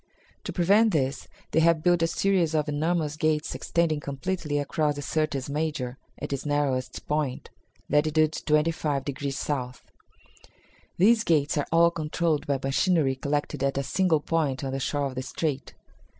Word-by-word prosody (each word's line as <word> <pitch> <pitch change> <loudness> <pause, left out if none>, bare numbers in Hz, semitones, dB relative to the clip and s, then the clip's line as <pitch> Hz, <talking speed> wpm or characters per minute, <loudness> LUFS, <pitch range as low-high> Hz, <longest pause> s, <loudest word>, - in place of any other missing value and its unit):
"To - - -3
prevent 200 +5 +3
this 135 -3 -1 0.2
they 160 - +3
have 160 -1 +3
built 175 -1 +3
a 165 - +3
series 175 -2 +1
of 150 -1 +1
enormous 150 +1 0
gates 155 0 0
extending 165 -3 0
completely 145 +2 -3
across 150 +1 0
the 145 - -5
Syrtis 155 -3 -1
Major 145 -4 -3 0.2
at - - -4
its 140 - -3
narrowest 145 -3 -1
point 150 -4 -2 0.4
(latitude 155 +1 +2
25 150 -2 +1
degrees 140 -1 -3
south). 125 -4 -3 1.1
These 220 +4 +5
gates 150 -5 +2
are 145 - -1
all 170 +1 +5
controlled 160 -1 -1
by 140 -1 +1
machinery 140 +1 +2
collected 145 0 -2
at 140 0 0
a 140 - 0
single 170 0 +1
point 150 -5 -1
on 135 - -2
the 135 - -2
shore 145 +1 -1
of 135 - -3
the 130 - -3
strait. 140 0 -3
150 Hz, 160 wpm, -26 LUFS, 140-165 Hz, 1.1 s, These